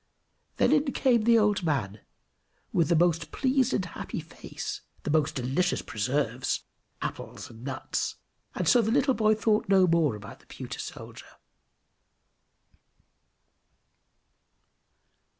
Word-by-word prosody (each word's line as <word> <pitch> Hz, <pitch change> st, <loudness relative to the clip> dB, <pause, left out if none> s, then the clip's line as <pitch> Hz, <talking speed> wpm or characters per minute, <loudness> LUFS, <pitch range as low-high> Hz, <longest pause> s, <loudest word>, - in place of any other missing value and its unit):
Then -, -, +3 dB
in 290 Hz, -2 st, +3 dB
came 235 Hz, -5 st, +3 dB
the 230 Hz, 0 st, +6 dB
old 210 Hz, -2 st, +3 dB
man 115 Hz, -, -1 dB, 0.7 s
with 165 Hz, -3 st, +2 dB
the 170 Hz, -, +4 dB
most 165 Hz, -1 st, +2 dB
pleased 265 Hz, -1 st, +1 dB
and 190 Hz, -, 0 dB
happy 165 Hz, -, -6 dB
face, -, -, -7 dB, 0.2 s
the 150 Hz, -, -2 dB
most 155 Hz, -1 st, +2 dB
delicious 140 Hz, +8 st, 0 dB
preserves, 125 Hz, +2 st, -1 dB, 0.4 s
apples, -, -, -6 dB
and 115 Hz, +1 st, -13 dB
nuts, 130 Hz, -1 st, -3 dB, 0.4 s
and -, -, -1 dB
so 245 Hz, -, +6 dB
the 220 Hz, -, -1 dB
little 270 Hz, +3 st, +3 dB
boy 215 Hz, -2 st, +3 dB
thought 215 Hz, -2 st, +1 dB
no 190 Hz, -1 st, +6 dB
more 165 Hz, -8 st, +2 dB
about 105 Hz, -1 st, -10 dB
the -, -, -25 dB
pewter -, -, -7 dB
soldier. -, -, -9 dB
175 Hz, 125 wpm, -28 LUFS, 140-225 Hz, 0.7 s, the